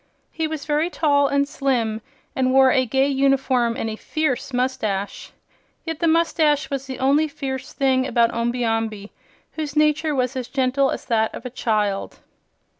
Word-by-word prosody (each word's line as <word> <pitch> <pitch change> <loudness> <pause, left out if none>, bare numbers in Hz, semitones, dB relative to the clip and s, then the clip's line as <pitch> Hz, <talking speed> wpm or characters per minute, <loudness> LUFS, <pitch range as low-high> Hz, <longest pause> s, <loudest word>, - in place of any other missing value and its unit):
He 320 -1 -2
was 310 -2 -5
very 305 +3 +1
tall 285 -4 +2
and 280 0 +1
slim 240 -6 -1 0.3
and 255 -1 +1
wore 265 0 +6
a 255 -1 +2
gay 265 +3 +2
uniform 270 -4 +1
and - - -2
a 220 - -3
fierce 275 +1 -2
mustache. 245 -6 -2 0.5
Yet 325 -2 -4
the 335 - +1
mustache 315 -3 +2
was 275 -1 -3
the 260 - -5
only 280 +4 +2
fierce 265 -2 -5
thing 265 -2 +1
about 235 -1 +2
Omby 240 +1 -1
Amby, 225 -2 -2 0.4
whose 305 -2 -5
nature 305 0 +2
was 255 0 -1
as 255 -2 -4
gentle 270 0 +1
as - - -4
that 220 -3 0
of - - -9
a 250 - -5
child. 210 -5 -1
265 Hz, 170 wpm, -22 LUFS, 240-290 Hz, 0.5 s, wore